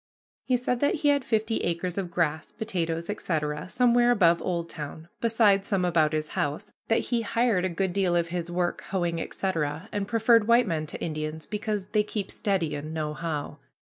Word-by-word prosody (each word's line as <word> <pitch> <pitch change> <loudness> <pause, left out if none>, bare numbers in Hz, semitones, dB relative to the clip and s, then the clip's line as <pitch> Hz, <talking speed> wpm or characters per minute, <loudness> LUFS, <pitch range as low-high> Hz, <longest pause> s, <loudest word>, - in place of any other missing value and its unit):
He 255 -2 +2
said 250 0 -1
that 285 - +2
he - - +6
had 285 -2 +3
fifty 220 -1 0
acres 175 +1 -2
of 190 -3 -2
grass, 160 -3 -1
potatoes, 170 -7 -2
etc., 155 -5 -2
somewhere 245 +1 +4
above 175 -8 +4
Oldtown, 165 -2 -4
besides 215 -4 +3
some 190 -3 +1
about 165 -3 +3
his 155 -1 -2
house; 150 +9 -3
that 225 - +3
he 235 -1 +2
hired 225 -4 +1
a - - +1
good 180 +1 -1
deal 185 -3 +2
of 170 -1 +1
his 175 -1 -3
work, 175 0 -1
hoeing, 175 -3 -1
etc., 165 0 -2
and 205 -1 -2
preferred 230 0 +4
white 235 +1 +5
men 160 -5 -2
to - - -7
Indians 155 -1 -4
because 210 -2 -3
"they 215 - +3
keep 210 -1 -4
steady 190 -8 -1
and 150 +2 -5
know 155 -1 -2
how." 150 -2 -4
180 Hz, 185 wpm, -27 LUFS, 165-215 Hz, -, he